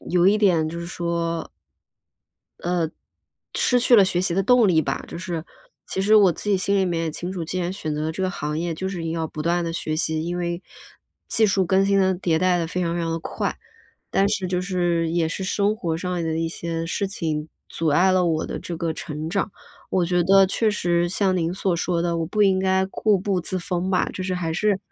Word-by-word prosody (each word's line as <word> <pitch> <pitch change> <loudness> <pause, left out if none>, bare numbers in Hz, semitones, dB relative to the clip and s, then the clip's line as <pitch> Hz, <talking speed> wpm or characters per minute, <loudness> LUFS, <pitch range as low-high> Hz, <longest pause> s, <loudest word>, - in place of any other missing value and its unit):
有 180 0 +4
一 205 +2 +5
点 175 -7 +3
就 170 - -5
是 170 - -5
说 170 -1 -2 1.2
呃， 175 +1 0 0.8
失 250 - +3
去 245 0 +4
了 200 - +7
学 180 -1 0
习 175 -2 0
的 195 - +2
动 245 +2 +5
力 160 -3 +4
吧。 - - -3
就 - - -7
是， 170 -3 -4 0.4
其 - - -3
实 205 +3 +4
我 195 -5 +6
自 210 - -6
己 195 - +4
心 200 +2 +1
里 190 - +3
面 170 -2 -1
也 160 - -1
清 175 +4 -5
楚， 175 -3 -4
既 185 +3 -3
然 175 +1 -1
选 155 -6 -4
择 150 - -2
了 160 +1 -1
这 190 - -4
个 185 - 0
行 150 -3 -3
业 170 -1 -2
就 190 +4 -3
是 185 -3 -5
一 - - -5
定 165 - -2
要 165 -1 -2
不 155 0 -6
断 170 +2 +1
地 165 - -3
学 155 -2 -2
习。 160 0 -1
因 175 +1 -3
为， 175 0 -3 0.7
技 220 -1 +3
术 195 -1 +2
更 190 +2 +3
新 200 0 +3
得 190 -1 +3
迭 175 -3 0
代 180 0 +2
得 165 - -1
非 180 +2 -3
常 170 0 -1
非 175 - -1
常 165 -1 -1
地 165 - -1
快。 - - -3 0.5
但 195 - +3
是 195 -3 -1
就 180 0 -1
是 175 -3 0
也 165 -1 +1
是 190 +3 -4
生 205 +3 +1
活 165 -6 -2
上 180 +2 -4
的 160 0 -1
一 165 0 0
些 165 0 -4
事 200 +4 -1
情， 160 -5 -3 0.2
阻 165 - -2
碍 175 +6 +4
了 185 -1 +3
我 160 -2 0
的 - - -4
这 170 - -6
个 165 0 -1
成 155 -1 -5
长。 195 +4 -1 0.4
我 185 -2 +2
觉 175 0 +2
得 195 +2 +6
确 215 +3 +1
实 175 -3 +1
像 190 0 +1
您 165 0 0
所 185 -1 0
说 170 0 0
的， 170 -1 0
我 165 - 0
不 210 +5 +1
应 190 -2 +4
该 190 0 +2
固 205 0 +1
步 190 -1 0
自 185 +2 -3
封 180 +1 -2
吧。 180 - +2
就 185 - -4
是 185 -1 -1
还 170 -2 -2
是， 200 +3 +1
175 Hz, 265 characters per minute, -23 LUFS, 165-190 Hz, 1.2 s, 了